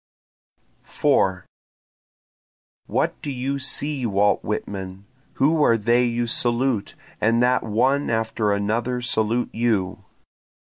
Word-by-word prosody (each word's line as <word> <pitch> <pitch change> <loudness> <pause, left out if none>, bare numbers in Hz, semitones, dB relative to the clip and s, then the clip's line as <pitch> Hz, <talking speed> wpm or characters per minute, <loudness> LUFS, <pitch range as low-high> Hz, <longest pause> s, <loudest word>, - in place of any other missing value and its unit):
4 95 -2 0 1.4
What - - -1
do 145 - -5
you 135 +2 -3
see 140 +1 -1
Walt 100 0 +1
Whitman? 95 -2 -5 0.3
Who 155 +3 +2
are 115 -5 +4
they 120 +3 +2
you 120 0 -1
salute, 120 -1 +1 0.3
and 115 +2 +3
that 125 +1 +2
one 130 +6 0
after 110 -1 0
another 110 +5 -1
salute 120 0 0
you? 105 -5 -1
115 Hz, 105 wpm, -22 LUFS, 105-125 Hz, 1.4 s, are